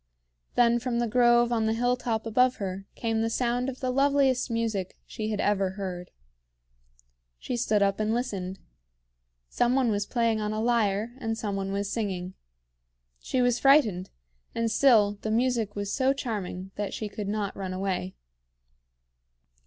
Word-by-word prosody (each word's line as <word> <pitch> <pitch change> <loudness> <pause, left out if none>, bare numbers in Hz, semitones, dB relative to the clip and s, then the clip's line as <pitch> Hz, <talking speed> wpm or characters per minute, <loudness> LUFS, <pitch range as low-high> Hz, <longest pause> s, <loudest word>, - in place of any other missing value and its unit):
Then 240 0 +4
from 240 -1 -2
the 240 - +1
grove 240 +1 +4
on 225 -2 +1
the 220 - +1
hilltop 245 -2 0
above 250 +3 +3
her, 195 -1 -5
came 225 -1 -1
the 225 - 0
sound 245 +2 0
of 260 - -8
the 255 -1 0
loveliest 275 -1 +2
music 225 -5 -2
she 215 -2 -5
had 210 -2 -2
ever 195 -2 +1
heard. 180 -3 -5 1.3
She 245 - -4
stood 215 -4 +2
up 195 0 +1
and 215 0 0
listened. 195 -6 -3 0.9
Some 245 - +1
one 255 -4 +2
was 205 -1 -1
playing 230 -2 +1
on 210 0 -2
a 215 - -2
lyre, 225 -1 +1
and 225 -2 -2
some 205 -3 -3
one 195 0 -3
was 200 0 -2
singing. 190 -5 -3 0.9
She 250 - 0
was 245 -1 +2
frightened; 250 -10 +4 0.5
and 230 -1 0
still 215 -5 +4
the 220 - -3
music 230 -2 0
was 205 0 -3
so 265 0 +2
charming 200 -8 -5
that 205 -2 -3
she 215 - -4
could 205 0 -6
not 205 -1 -2
run 190 -2 -5
away. 185 - -3
220 Hz, 160 wpm, -27 LUFS, 200-240 Hz, 1.3 s, Then